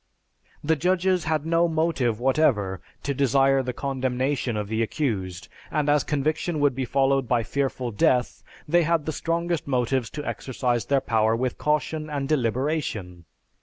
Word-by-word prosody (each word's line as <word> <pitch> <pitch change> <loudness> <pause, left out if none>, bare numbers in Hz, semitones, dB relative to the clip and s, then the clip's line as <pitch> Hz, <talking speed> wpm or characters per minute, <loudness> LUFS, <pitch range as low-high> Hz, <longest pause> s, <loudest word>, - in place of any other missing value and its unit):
The 160 +2 +2
judges 180 +2 +1
had 155 -2 0
no 165 +1 +3
motive 155 -9 0
whatever 120 - +1 0.2
to 140 - -1
desire 135 0 +3
the 125 -1 -3
condemnation 130 -2 -1
of 105 -1 -3
the 110 +2 -1
accused, 100 - -2 0.2
and 150 -2 0
as 145 -1 +3
conviction 155 +3 -1
would 145 -2 +3
be 130 +1 -2
followed 135 0 +1
by 120 -1 +2
fearful 130 0 -2
death, 125 +4 +1 0.3
they 175 +3 +4
had 165 -2 +1
the 155 - -1
strongest 170 0 -2
motives 125 -2 0
to 150 - -4
exercise 125 -2 -1
their 140 -1 +2
power 110 -3 +2
with 125 +1 -2
caution 155 +1 -1
and 140 -2 -2
deliberation. 120 - -1
135 Hz, 155 wpm, -25 LUFS, 120-155 Hz, 0.3 s, they